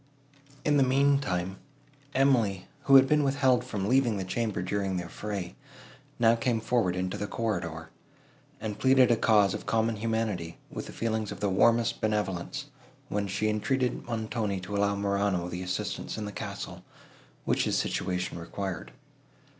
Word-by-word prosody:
In 150 -1 +4
the - - +4
mean 140 +2 +3
time, 95 -6 -3 0.6
Emily, 120 -8 +2 0.2
who 135 - +6
had 135 0 +9
been 150 +1 +3
withheld 135 -3 +3
from 105 -6 -3
leaving 125 -3 +3
the 95 - -2
chamber 105 0 -2
during 95 0 -1
the 90 - -2
affray, 95 0 -5 0.6
now 115 -1 +5
came 115 0 0
forward 110 -5 +1
into 90 0 -2
the 105 - -3
corridor, 85 -9 -3 0.7
and 105 -1 -5
pleaded 130 -2 +5
a - - +5
cause 105 -4 +4
of - - -6
common 115 0 +1
humanity, 105 -7 -2
with - - -6
the - - -8
feelings 110 -2 -2
of - - -7
the 100 - 0
warmest 115 +4 +3
benevolence, 105 -5 -1 0.4
when 100 0 -1
she 105 +3 -1
entreated 125 +4 0
Montoni 110 -3 -2
to 100 +3 -5
allow 100 0 +2
Morano 100 -3 0
the 90 +1 -5
assistance 90 +3 -3
in 110 - -3
the 105 - -5
castle, - - -6 0.6
which - - +1
his - - +1
situation 90 -1 -2
required. 95 +1 -5
105 Hz, 160 wpm, -28 LUFS, 95-120 Hz, 0.7 s, had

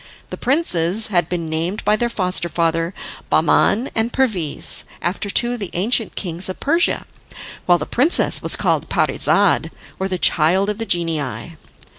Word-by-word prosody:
The - - -4
princes 220 - +2
had 175 -4 0
been 170 -2 -3
named 165 +6 -3
by 210 - +3
their 240 +2 -1
foster 180 -5 0
father 165 +1 -1 0.3
Bahman 235 +6 +2
and 225 +2 -1
Perviz, 200 - +1 0.2
after 195 +3 -3
two 240 +4 +2
of 245 - -5
the 200 -4 -4
ancient 220 +5 0
kings 175 0 -3
of 185 - -6
Persia, 330 +4 +1 0.6
while 175 -1 +5
the - - -5
princess 285 +8 +1
was - - +4
called - - -1
Parizade, - - +1 0.3
or 190 - -1
the 185 -1 -2
child 180 +5 +2
of 210 - -8
the 225 - -4
genii. 160 - -2
185 Hz, 160 wpm, -19 LUFS, 170-225 Hz, 0.6 s, while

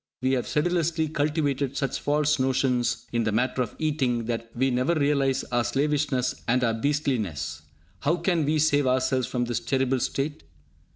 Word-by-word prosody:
We 130 +1 +1
have 130 -2 0
sedulously 165 0 +1
cultivated 145 -3 -1
such 135 0 -1
false 150 0 +1
notions 130 -2 +1
in 115 -1 +1
the 110 - 0
matter 125 +4 0
of 120 - -3
eating 135 -7 0
that 115 0 -3
we 130 +2 +1
never 130 +7 +1
realise 140 -3 +1
our 120 0 +2
slavishness 140 -2 0
and 125 +2 +2
our 115 -2 +2
beastliness. 110 - -1 0.4
How 155 +4 +1
can 170 -1 +1
we 150 +2 +1
save 145 -3 +3
ourselves 130 0 +1
from 120 -1 -1
this 120 -1 -1
terrible 135 -1 0
state? 135 +3 -2
135 Hz, 165 wpm, -26 LUFS, 125-150 Hz, 0.4 s, save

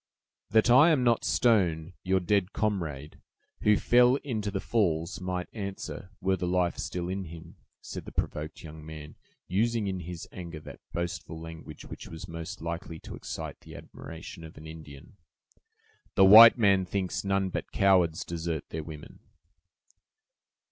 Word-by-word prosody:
"That 110 +2 +4
I 135 +7 +8
am 150 -6 +3
not 120 -2 +3
stone, 90 -8 +2
your 95 0 +2
dead 95 +1 +1
comrade, 80 -9 -3 0.4
who 105 -1 +4
fell 125 +1 +5
into 110 -7 -2
the 100 -1 -2
falls, 85 -8 0
might 90 -1 -3
answer, 100 -3 -6
were 95 0 +1
the 90 -1 -3
life 90 -1 +1
still 90 -1 -3
in 95 +1 -3
him," 85 +1 -11 0.2
said - - -7
the - - -8
provoked 75 +2 -4
young 80 -1 -10
man, 75 -1 -9 0.3
using, 110 +3 +1
in 95 -1 -2
his 85 -1 -7
anger, 85 -3 -7
that - - -11
boastful 85 -1 -4
language 80 -2 -10
which - - -9
was 80 0 -8
most 80 -1 -7
likely 85 0 -5
to - - -8
excite - - -6
the - - -13
admiration 80 0 -10
of 80 - -11
an 75 - -11
Indian. 80 +2 -11 1.0
"The 95 - +7
white 110 +5 +10
man 100 -4 +4
thinks 95 0 -2
none 95 -1 +1
but - - -5
cowards 90 -5 +3
desert 80 -2 -4
their 80 0 -4
women." 75 -1 -10
90 Hz, 155 wpm, -28 LUFS, 80-100 Hz, 1.0 s, white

